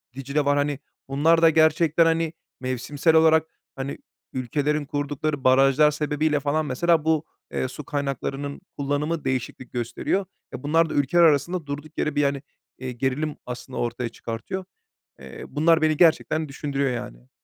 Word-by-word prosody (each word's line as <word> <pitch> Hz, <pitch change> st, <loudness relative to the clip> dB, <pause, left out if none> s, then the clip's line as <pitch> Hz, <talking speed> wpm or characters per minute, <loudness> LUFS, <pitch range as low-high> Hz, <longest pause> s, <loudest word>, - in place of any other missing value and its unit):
Dicle 140 Hz, +2 st, -1 dB
var, 145 Hz, 0 st, +3 dB
hani, 145 Hz, -1 st, 0 dB, 0.3 s
bunlar 160 Hz, +4 st, +3 dB
da 165 Hz, -, +7 dB
gerçekten, 160 Hz, +1 st, +4 dB
hani, 165 Hz, 0 st, +1 dB, 0.3 s
mevsimsel 140 Hz, +5 st, 0 dB
olarak, 160 Hz, 0 st, +5 dB, 0.3 s
hani, 135 Hz, +1 st, -4 dB, 0.4 s
ülkelerin 145 Hz, +4 st, -1 dB
kurdukları 145 Hz, 0 st, -2 dB
barajlar 135 Hz, +3 st, +5 dB
sebebiyle 150 Hz, 0 st, 0 dB
falan 150 Hz, +2 st, 0 dB
mesela 160 Hz, +4 st, +1 dB
bu, 160 Hz, -1 st, +2 dB, 0.3 s
eee, 130 Hz, -, -1 dB
su 135 Hz, +3 st, -8 dB
kaynaklarının 140 Hz, +1 st, -3 dB, 0.2 s
kullanımı 145 Hz, +3 st, -1 dB
değişiklik 130 Hz, -1 st, -3 dB
gösteriyor. 120 Hz, -, -1 dB, 0.3 s
E, -, -, -7 dB
bunlar 165 Hz, +3 st, +3 dB
da -, -, -4 dB
ülkeler 145 Hz, +5 st, +3 dB
arasında 165 Hz, +2 st, +3 dB
durduk 145 Hz, +2 st, -7 dB
yere 150 Hz, -1 st, -1 dB
bir 145 Hz, -, +3 dB
hani, 140 Hz, -1 st, 0 dB, 0.4 s
iii, 125 Hz, -2 st, -6 dB
gerilim 140 Hz, +4 st, -1 dB
aslında 125 Hz, 0 st, -6 dB
ortaya 120 Hz, 0 st, -2 dB
çıkartıyor. 115 Hz, +13 st, -6 dB, 0.6 s
Eee, -, -, -9 dB
bunlar 160 Hz, +2 st, +3 dB
beni 155 Hz, -1 st, +3 dB
gerçekten 160 Hz, -2 st, +3 dB
düşündürüyor 140 Hz, -1 st, -2 dB
yani. 65 Hz, -, -7 dB
145 Hz, 150 wpm, -24 LUFS, 135-155 Hz, 0.6 s, da